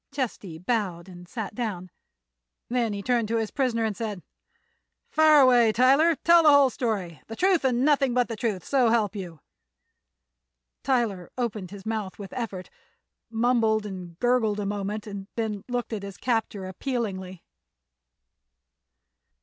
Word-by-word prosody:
Chesty 230 - -4
bowed 185 -3 -2
and 180 -1 -12
sat 220 -4 -5
down. 200 -6 -4 0.8
Then 240 -2 0
he 200 -1 -5
turned 240 -2 +1
to 230 +1 0
his 220 -2 -2
prisoner 245 -5 0
and 215 -2 -2
said: 210 -4 -5 0.9
"Fire 310 -2 +6
away, 245 -4 +5
Tyler. 275 +8 +4
Tell 335 +3 +5
the 310 - +6
whole 285 -2 +6
story—the 205 - -4
truth 370 +2 +2
and 255 0 +2
nothing 275 -4 +3
but 245 -1 +2
the 230 - -4
truth 210 -5 -2
so 260 -4 +3
help 220 -2 +1
you." 175 -7 -7 1.4
Tyler 230 -9 0
opened 215 -7 -3
his 200 0 -11
mouth 215 -4 -3
with 200 -2 -9
effort, 205 -7 -5 0.6
mumbled 225 -2 +2
and 180 -4 -8
gurgled 240 -3 +1
a 205 - -2
moment 205 +1 -3
and 200 -2 -7
then 215 -3 -3
looked 245 -2 -3
at 210 - -3
his 200 -1 -8
captor 225 -5 -1
appealingly. 190 -4 -4
220 Hz, 145 wpm, -26 LUFS, 195-250 Hz, 1.4 s, Fire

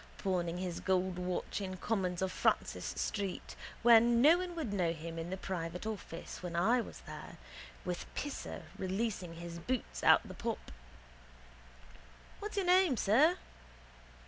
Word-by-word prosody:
Pawning 175 -3 -1
his 180 -2 -3
gold 185 -1 +1
watch 180 +3 -2
in 185 -1 -4
Cummins 185 -4 -1
of 190 - 0
Francis - - +1
street 200 -3 -3 0.3
where 235 -1 +9
no 240 +9 +6
one 360 -1 -4
would 300 -11 -3
know 175 -4 +1
him 165 +1 -6
in 165 +1 -4
the 190 - -3
private 180 -1 -4
office 195 -6 -6
when 175 -1 -5
I 230 +9 +4
was - - -9
there - - -9 0.5
with 180 -1 -4
Pisser 290 -1 -4 0.2
releasing 190 -3 -2
his 170 0 -7
boots 250 +8 -3
out - - +7
of - - -12
the - - -6
pop. - - -4 1.7
What's 420 0 -5
your 390 - +2
name, 360 -7 +5
sir? 285 - +4
190 Hz, 150 wpm, -34 LUFS, 175-235 Hz, 1.7 s, where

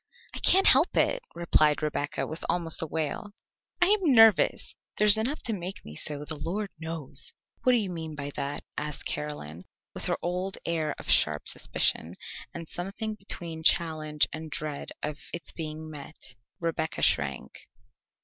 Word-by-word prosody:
"I - - -2
can't 385 +1 +5
help 275 +7 +6
it," - - +2
replied 155 -3 +2
Rebecca 145 -1 -2
with 160 - -6
almost 170 -2 +2
a 160 - -3
wail. 160 +6 -4 0.5
"I 355 - +6
am 385 -9 +3
nervous. 225 -4 +5 0.2
There's 210 0 +9
enough 240 +8 -1
to 230 - +2
make 185 -1 -6
me 75 - -9
so, 145 - +3
the 155 -1 -5
Lord 200 +4 -3
knows." 160 -5 -4 0.3
"What 255 - +4
do - - +5
you 200 -5 -1
mean 160 -3 -6
by 145 -1 -5
that?" 140 +1 -3 0.2
asked 150 -1 -5
Caroline 90 - -5 0.3
with - - -5
her - - 0
old 180 +2 -2
air 160 -3 -1
of - - -10
sharp 75 -1 +3
suspicion, 85 +3 +1 0.4
and 165 -1 -8
something 195 +6 -4
between 170 -5 -6
challenge 155 -2 +2
and 160 0 -6
dread 150 -2 -4
of 150 0 -4 0.2
its 170 - -5
being 155 -1 -6
met. 145 -3 -10 0.3
Rebecca 160 -1 -2
shrank. 70 -3 0
160 Hz, 160 wpm, -28 LUFS, 150-195 Hz, 0.5 s, There's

